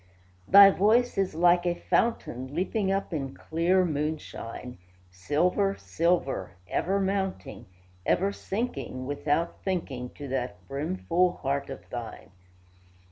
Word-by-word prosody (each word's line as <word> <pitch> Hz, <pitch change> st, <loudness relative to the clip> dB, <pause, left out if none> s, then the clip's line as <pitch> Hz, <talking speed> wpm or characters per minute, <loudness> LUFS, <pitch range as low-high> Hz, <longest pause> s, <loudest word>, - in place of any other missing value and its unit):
Thy 200 Hz, +1 st, +9 dB
voice 225 Hz, +6 st, +3 dB
is 195 Hz, -5 st, 0 dB
like 175 Hz, +1 st, +4 dB
a 175 Hz, -1 st, 0 dB
fountain, 140 Hz, -, -1 dB
Leaping 195 Hz, +3 st, 0 dB
up 195 Hz, -2 st, -1 dB
in 135 Hz, -4 st, -3 dB
clear 175 Hz, +3 st, +1 dB
moonshine; 145 Hz, -, -4 dB, 0.3 s
Silver, 175 Hz, -, +1 dB
silver, 165 Hz, -, 0 dB
ever 195 Hz, -, 0 dB
mounting, 190 Hz, -, -2 dB, 0.4 s
Ever 195 Hz, -, +2 dB
sinking, 190 Hz, -, -4 dB
Without 145 Hz, +4 st, -1 dB
thinking, 140 Hz, -10 st, -3 dB
To 145 Hz, -, -7 dB
that 130 Hz, -1 st, -4 dB
brimful 175 Hz, +5 st, 0 dB
heart 140 Hz, +1 st, -1 dB
of 135 Hz, -, -8 dB
thine. 120 Hz, -5 st, -7 dB
170 Hz, 115 wpm, -27 LUFS, 135-190 Hz, 0.4 s, Thy